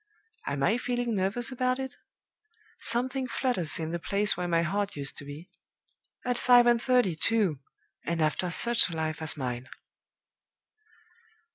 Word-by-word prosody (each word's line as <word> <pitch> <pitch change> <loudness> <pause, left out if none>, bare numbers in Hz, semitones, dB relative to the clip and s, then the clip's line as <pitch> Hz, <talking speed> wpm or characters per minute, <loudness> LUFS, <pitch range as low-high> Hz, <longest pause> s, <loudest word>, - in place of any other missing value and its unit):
Am 140 -1 -2
I 225 - +2
feeling 245 -1 -2
nervous 200 +6 0
about 255 0 0
it? 265 -1 -6 0.8
Something 255 +3 0
flutters 235 - 0
in 160 -1 -4
the 170 - -3
place 200 +5 +2
where 180 - -3
my 170 -1 +1
heart 200 +4 -2
used 140 -1 -2
to 145 - -9
be. 145 +5 -10 0.7
At 245 -1 -1
five 245 -1 +6
and 240 -1 +3
thirty, 250 -8 +2
too! 195 -5 0 0.4
and 170 +1 -3
after 155 +3 0
such 235 +4 +4
a 165 - -6
life 155 0 -3
as 160 -1 +1
mine!" 125 -1 -5
200 Hz, 150 wpm, -28 LUFS, 160-245 Hz, 0.8 s, five